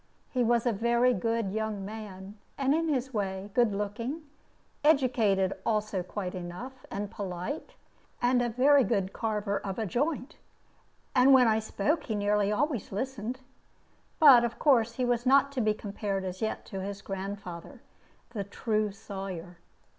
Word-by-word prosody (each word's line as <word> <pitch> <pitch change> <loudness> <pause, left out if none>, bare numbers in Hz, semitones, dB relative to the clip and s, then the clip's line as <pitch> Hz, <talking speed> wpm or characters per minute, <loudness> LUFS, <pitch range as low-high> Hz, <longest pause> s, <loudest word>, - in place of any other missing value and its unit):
He 250 -2 +1
was 235 0 +2
a 240 - +3
very 235 +4 +3
good 230 -4 -1
young 215 -2 -3
man, 205 -1 -8 0.2
and 275 0 +2
in 325 +1 +1
his 265 -2 -1
way 195 -1 -3
good 240 -3 +3
looking, 220 +10 -3 0.6
educated 235 -10 +3
also 215 -3 0
quite 185 0 -5
enough, 185 +9 -8
and 200 +1 -4
polite, 195 - -5 0.4
and 245 0 +3
a 240 - 0
very 270 +4 +5
good 200 -3 0
carver 210 -2 -1
of 195 -2 -5
a 225 - -1
joint; 285 - -2 0.8
and 265 +1 +6
when 250 -2 +6
I 220 0 +3
spoke, 220 +8 -1
he 220 - -2
nearly 205 0 +1
always 255 +1 -1
listened. 250 +3 -4 0.8
But 275 -7 +8
of 235 -1 -2
course 235 -6 +3
he 250 +1 -1
was 245 0 0
not 275 +1 +5
to 265 -3 -1
be 215 -1 +2
compared 200 -2 -3
as 185 0 -5
yet 220 - -2
to 195 -3 -6
his 200 +1 -6
grandfather, 195 -3 -6 0.5
the 205 -4 -3
true 215 +1 -1
Sawyer. 190 -4 -7
220 Hz, 155 wpm, -29 LUFS, 200-250 Hz, 0.8 s, But